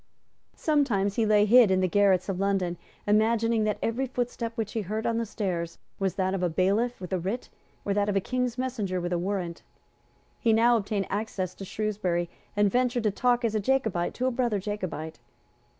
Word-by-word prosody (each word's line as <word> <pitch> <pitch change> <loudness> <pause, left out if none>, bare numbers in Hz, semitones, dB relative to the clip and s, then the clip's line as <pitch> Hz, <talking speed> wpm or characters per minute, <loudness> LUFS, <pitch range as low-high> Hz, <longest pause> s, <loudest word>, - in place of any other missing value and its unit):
Sometimes 245 -11 +1
he 225 -2 +2
lay 210 -1 +5
hid 235 0 +7
in 190 0 +3
the 185 - +2
garrets 195 -1 +3
of 190 -2 -2
London, 195 -3 0 0.3
imagining 225 +1 +2
that 210 -1 0
every 250 +4 0
footstep 245 -2 -3
which 220 -3 -3
he 225 - -1
heard 215 +3 -3
on 230 0 +1
the 230 - -2
stairs 175 -6 -3 0.2
was 190 -3 0
that 190 -1 0
of 195 - -1
a 180 - +1
bailiff 200 +8 +1
with 185 0 -6
a 185 - +1
writ, 200 +8 -3 0.4
or 200 - +1
that 205 0 +1
of 200 - 0
a - - +4
King's 250 +4 -2
messenger 225 -8 -2
with 175 0 -2
a 175 - +1
warrant. 180 -2 -3 0.8
He 230 -2 +3
now 235 +2 +5
obtained 205 -2 -1
access 195 -3 -2
to 195 - -8
Shrewsbury, 185 -5 -2 0.3
and 205 -1 +4
ventured 245 0 +1
to 215 - +2
talk 245 +3 +1
as 225 - 0
a 215 - +1
Jacobite 215 -7 0
to 255 - -1
a 260 - +2
brother 240 -3 0
Jacobite. 185 -6 -5
205 Hz, 200 wpm, -27 LUFS, 190-230 Hz, 0.8 s, hid